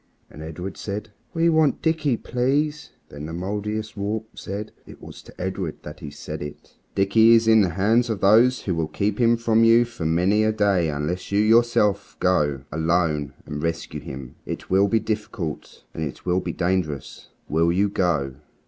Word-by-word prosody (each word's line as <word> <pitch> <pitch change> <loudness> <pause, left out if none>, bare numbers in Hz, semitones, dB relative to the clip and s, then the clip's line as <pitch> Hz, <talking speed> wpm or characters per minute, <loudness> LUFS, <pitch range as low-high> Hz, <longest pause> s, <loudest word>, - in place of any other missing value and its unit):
And 75 - -11
Edred 90 +4 -6
said, 105 +1 -5 0.2
"We 165 -1 +1
want 160 -3 +2
Dickie, 155 -6 +1
please." 145 +6 -1 0.2
Then 75 +1 -8
the 80 - -7
Mouldiestwarp 105 +3 -3
said, 100 +3 -6
and - - -12
it - - -28
was - - -11
to - - -17
Edred 95 -3 -4
that 75 +3 -9
he 75 - -7
said 70 - -7
it 75 0 -9 0.2
"Dickie 110 +4 +5
is 115 0 +3
in 110 -1 +6
the 95 - +2
hands 110 +8 +2
of 110 -3 -2
those 115 +6 +4
who 95 - -1
will 80 -2 -1
keep 100 +8 -2
him 120 -1 +4
from 115 -1 +3
you 115 +1 +6
for 120 -9 -5
many 90 +6 +2
a 110 - +3
day 100 -6 +2
unless 75 +7 -3
you 100 - +1
yourself 110 -2 +3
go, 75 -7 +1
alone, 80 -3 0
and 75 0 -5
rescue 85 +1 -3
him. 65 -2 -8
It - - -7
will 95 +2 +4
be 115 +2 +2
difficult, 105 -7 -5
and 80 - -4
it 70 - -6
will 90 0 +2
be 90 -2 -4
dangerous. 85 -6 -2 0.2
Will 80 +2 +2
you 100 +4 +2
go?" 85 -9 0
100 Hz, 185 wpm, -23 LUFS, 80-110 Hz, 0.2 s, in